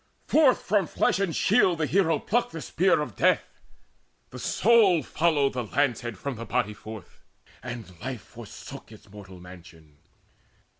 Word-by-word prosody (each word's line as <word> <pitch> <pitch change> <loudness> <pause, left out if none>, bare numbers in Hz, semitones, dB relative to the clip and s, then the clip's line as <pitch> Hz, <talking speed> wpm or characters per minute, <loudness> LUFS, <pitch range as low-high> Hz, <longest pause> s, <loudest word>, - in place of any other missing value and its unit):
Forth 290 -5 +3
from 200 -4 +1
flesh - - +1
and 195 -5 -1
shield 190 -5 +3
The 155 - 0
hero 165 -2 +2
plucked 235 +4 -1
the 165 - -6
spear 180 0 +2
of 125 -8 -6
death: - - +1 0.7
the - - -9
soul 205 -7 +3
Followed 150 -4 +1
the 125 -1 -3
lance 130 +1 0
head 120 -4 -6
from 135 +3 -5
the 115 - -7
body 105 - -1
forth, 110 -3 -11 0.4
And 120 -6 -8
life 125 -2 -5
forsook 115 -1 -11
its 105 -2 -16
mortal 95 -3 -12
mansion. 85 -4 -15
130 Hz, 155 wpm, -26 LUFS, 105-175 Hz, 0.7 s, Forth